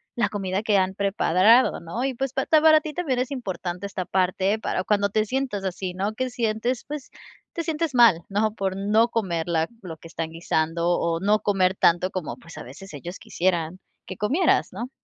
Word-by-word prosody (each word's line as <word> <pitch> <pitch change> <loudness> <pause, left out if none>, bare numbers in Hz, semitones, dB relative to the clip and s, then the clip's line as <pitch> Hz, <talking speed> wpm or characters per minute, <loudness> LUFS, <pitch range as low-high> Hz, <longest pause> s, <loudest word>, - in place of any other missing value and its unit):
la 235 - +1
comida 195 -1 -2
que 210 -2 +3
han 190 0 +1
preparado 200 +3 +3
¿no?, 170 +9 -5
y, 270 0 0
pues, 270 +1 -3
pa 270 - -1
ta 315 -2 +5
para 315 -1 +6
ti 310 0 -6
también 280 -8 -1
es 255 - -1
importante 185 -7 -4
esta 190 -2 -4
parte 190 +3 +1
para 185 - -2
cuando 200 0 +1
te 215 +2 +1
sientas 250 -4 -2
así, 185 -1 -3
¿no?, 195 +4 -2
que 255 +3 -2
sientes, 235 +1 -1
pues, 295 -2 -6 0.4
te 335 - -3
sientes 320 -2 -2
mal, 230 -9 +6
¿no?, 210 +2 0
por 190 -2 -2
no 210 +4 +2
comer 180 -8 -2
la 165 -2 +1 0.2
lo 165 -3 -7
que 165 - -13
están 165 -1 -4
guisando 165 0 -1
o 165 0 0
no 205 +3 +2
comer 190 -3 +1
tanto 175 0 +3
como, 185 -4 -4
pues, 165 - -14
a - - -7
veces 170 +10 -11
ellos 170 +6 -7
quisieran 175 -1 -1 0.3
que 185 - -7
comieras, 290 - +2
¿no? 235 +7 -6
200 Hz, 205 wpm, -24 LUFS, 180-240 Hz, 0.4 s, para